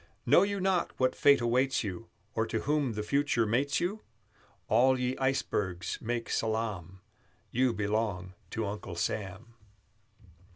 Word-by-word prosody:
Know 145 +8 +6
you 200 0 0
not 185 -2 0
what 130 0 +2
fate 140 -3 +5
awaits 125 +3 +1
you, 105 +2 -5 0.3
Or 110 0 0
to 110 - -2
whom 145 -3 0
the 105 0 -3
future 140 -1 +1
mates 130 +6 +1
you? 200 +5 -2 0.7
All 130 +4 +4
ye 125 +1 0
icebergs 95 -10 -1
make 115 0 -2
salaam, 105 -5 -2 0.5
You 130 +1 +2
belong 105 -4 -2 0.2
to 110 -1 -2
Uncle 100 -3 -5
Sam! 95 +5 -3
115 Hz, 135 wpm, -30 LUFS, 105-135 Hz, 0.7 s, Know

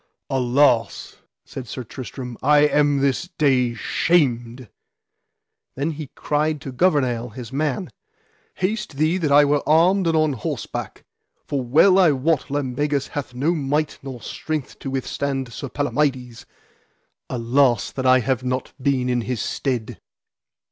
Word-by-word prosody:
Alas, 130 -2 +1 0.3
said 130 -3 -8
Sir 130 +3 -6
Tristram, 125 +1 -8
I 145 +2 +5
am 145 -1 +3
this 140 +6 0
day 130 -5 +2
shamed. 125 -3 0 1.1
Then 145 +5 -1
he 155 -1 -7
cried 150 +1 0
to 135 - -6
Gouvernail 125 -6 +1
his 115 +2 -9
man: 140 -3 -2 0.6
Haste 190 -5 -2
thee 155 +5 +2
that 155 -5 0
I 145 +1 +7
were 145 0 +2
armed 175 +4 +4
and 165 -1 +2
on 155 -2 +2
horseback, 120 - -5 0.4
for 140 - -2
well 160 +10 +5
I 170 -6 +5
wot 145 +2 0
Lambegus 145 +1 -1
hath 135 -4 -6
no 145 +7 +1
might 150 0 -1
nor 130 -3 -8
strength 155 -4 -5
to 135 - -5
withstand 135 -1 -3
Sir 140 - -6
Palamides: 135 -4 -2 0.8
alas 125 -1 +2
that 130 -1 -2
I 130 0 +6
have 130 +2 -1
not 125 0 -3
been 130 -2 +1
in 125 -1 +1
his 115 +1 -3
stead! 120 - -3
135 Hz, 140 wpm, -22 LUFS, 125-150 Hz, 1.1 s, I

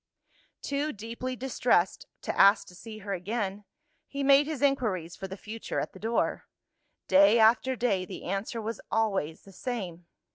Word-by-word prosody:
Too 285 +2 -1
deeply 230 +4 -5
distressed 240 -7 +1 0.2
to - - -2
ask 200 +2 +6
to - - -15
see 215 +4 -10
her 200 - -2
again, 200 +1 -3 0.4
he 280 0 -4
made 280 +1 +6
his 305 -3 -3
inquiries 210 - 0
for 195 - -6
the 190 +1 -7
future 220 +3 -5
at - - -4
the 190 - -12
door. 225 +3 -1 0.6
Day 200 +4 +6
after 235 +4 +4
day, 225 -6 +1
the - - -8
answer 195 +5 -3
was 225 0 -4
always 195 -8 0
the 195 - -14
same. 185 -8 -5
220 Hz, 160 wpm, -29 LUFS, 190-250 Hz, 0.6 s, ask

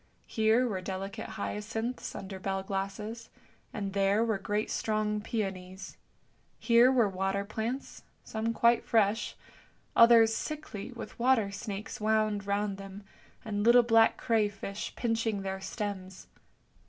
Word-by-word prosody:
Here 225 +3 +2
were 190 -5 -3
delicate 190 +1 -5
hyacinths 225 +4 -4
under 190 -1 -7
bell 195 0 -2
glasses, 200 +4 -4 0.4
and 200 -2 -4
there 200 +3 +2
were 220 -4 0
great 205 +2 -2
strong 215 -1 -1
peonies; 190 -4 -5 0.6
here 235 +2 +5
were 240 -5 +4
water 195 +1 -1
plants, 225 +5 -4 0.2
some 220 +1 -2
quite 235 +1 +3
fresh, 220 0 +1 0.6
others 230 -1 +7
sickly 275 -8 -5
with 240 -1 -9
water 235 -5 +3
snakes 200 +2 -6
wound 215 -2 +1
round 200 0 -1
them, 195 +1 -9 0.4
and 205 -2 -2
little 240 +3 +6
black 225 -1 +4
cray 220 -3 +2
fish 200 0 -6
pinching 225 -3 -1
their 190 0 -4
stems. 190 -2 -5
210 Hz, 130 wpm, -30 LUFS, 195-225 Hz, 0.6 s, others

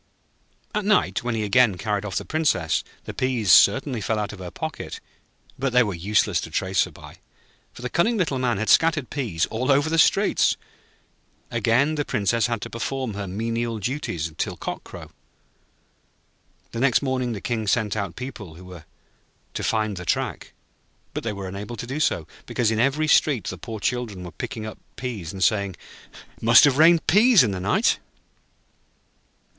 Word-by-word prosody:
At 210 -1 -1
night, 210 +1 +2
when 120 -1 -1
he 110 - -1
again 105 -1 +3
carried 105 0 -2
off 100 - -5
the - - -2
Princess, 140 - 0 0.2
the - - -7
peas 125 -7 0
certainly 125 - +5
fell 110 +2 -1
out 105 -1 -3
of 105 - -11
her 90 -1 -6
pocket, - - -6 0.6
but 130 -1 -1
they 125 0 +6
were 105 -3 -3
useless 100 +5 +1
to - - -7
trace 95 -1 +1
her - - -10
by, - - -13 0.5
for 120 - -12
the - - -1
cunning 225 - +1
Little 155 -9 0
Man 120 -4 0
had 110 +1 -2
scattered 160 -5 +3
peas 115 - -1
all 125 +5 0
over 145 +3 +2
the 165 - +2
streets. - - +3 0.9
Again 130 +7 +2
the 150 -1 -1
Princess 115 0 0
had 115 -3 -3
to - - -6
perform 130 0 -3
her 100 0 -5
menial 115 +4 -2
duties 100 - -3
till - - -2
cock - - -5
crow. - - -11 1.6
The 115 - -5
next 135 +1 +3
morning 130 -3 -1
the 105 - -5
King 110 0 -3
sent 110 0 +1
out 100 -5 -3
people 120 -10 -8
who 90 +2 -13
were 90 -4 -11 0.7
to - - -4
find 110 -3 0
the 90 - -6
track; - - -2 0.6
but - - -4
they 115 - -2
were 100 -1 -6
unable 100 +5 -6
to 115 - -6
do 135 +5 -4
so, 85 - +1 0.2
because 115 -3 0
in 110 - -1
every 140 +5 +2
street 145 -6 +3
the - - -6
poor 110 -2 -7
children 110 -5 -2
were 90 - -8
picking 110 +4 -6
up 110 - -8 0.2
peas, 110 -10 -5
and 95 -2 -3
saying: 100 -3 +1 0.6
'It - - -23
must 115 +1 +7
have 145 -1 +4
rained 165 +1 +6
peas 215 - +6
in 110 - 0
the 95 - -4
night.' 95 +3 +2
115 Hz, 185 wpm, -24 LUFS, 100-130 Hz, 1.6 s, must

